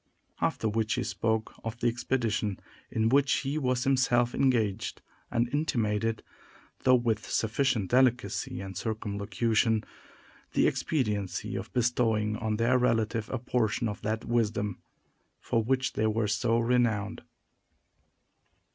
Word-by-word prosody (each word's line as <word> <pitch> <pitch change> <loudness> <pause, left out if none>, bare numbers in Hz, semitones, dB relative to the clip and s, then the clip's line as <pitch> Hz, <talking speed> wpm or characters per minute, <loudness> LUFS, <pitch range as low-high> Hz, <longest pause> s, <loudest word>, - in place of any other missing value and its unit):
After - - 0
which, 110 +1 0
he - - -1
spoke 110 -1 -1
of 115 +1 -4
the 120 - +1
expedition 115 -4 -1 0.3
in 110 0 +1
which 140 +2 +3
he 140 +3 -2
was 125 -3 0
himself 125 -3 +2
engaged, 115 -7 +1 0.3
and 120 +1 +1
intimated, 115 -7 0 0.6
though 130 -1 +7
with 115 -3 0
sufficient 110 -3 0
delicacy 125 -7 +1
and 95 -1 -7
circumlocution, 110 +2 0 0.7
the - - +3
expediency 105 - -1
of 95 +1 -5
bestowing 115 -4 +1
on 110 -1 -2
their 120 +3 +3
relative 115 -2 +1
a 130 - -1
portion 120 -1 0
of 105 - -5
that 110 +1 -2
wisdom 110 -4 0 0.6
for 115 - 0
which 130 +2 0
they 110 - +1
were 110 0 +1
so 110 +3 +1
renowned. 115 -3 +1
115 Hz, 125 wpm, -29 LUFS, 105-125 Hz, 0.7 s, though